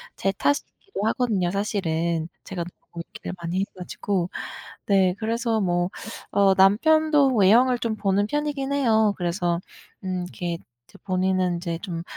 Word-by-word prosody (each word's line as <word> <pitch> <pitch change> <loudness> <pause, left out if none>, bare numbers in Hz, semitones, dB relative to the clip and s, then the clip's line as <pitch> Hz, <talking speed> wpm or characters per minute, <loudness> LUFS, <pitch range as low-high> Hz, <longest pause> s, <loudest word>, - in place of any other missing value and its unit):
제 195 - 0
탓이기도 285 - -2
하거든요 215 -7 +1
사실은. 170 -5 -1 0.2
제가 180 -3 -4 0.3
너무 170 - -6
얘기를 - - -7
많이 170 +2 -2
해 - - +2
가지고 185 0 -2 0.6
네. 190 -3 +3
그래서 230 0 0
뭐 175 -1 +1 0.4
어 200 -1 +4
남편도 280 +8 +4
외형을 235 +5 +5
좀 230 -2 -1
보는 205 -1 +1
편이긴 290 0 -2
해요. 220 -6 +3
그래서 175 -1 0 0.4
음 185 -1 -2
이렇게 175 -1 -4 0.5
본인은 185 -1 +1
인제 170 -1 -3
좀 170 -3 -5
195 Hz, 285 characters per minute, -24 LUFS, 180-230 Hz, 0.6 s, 외형을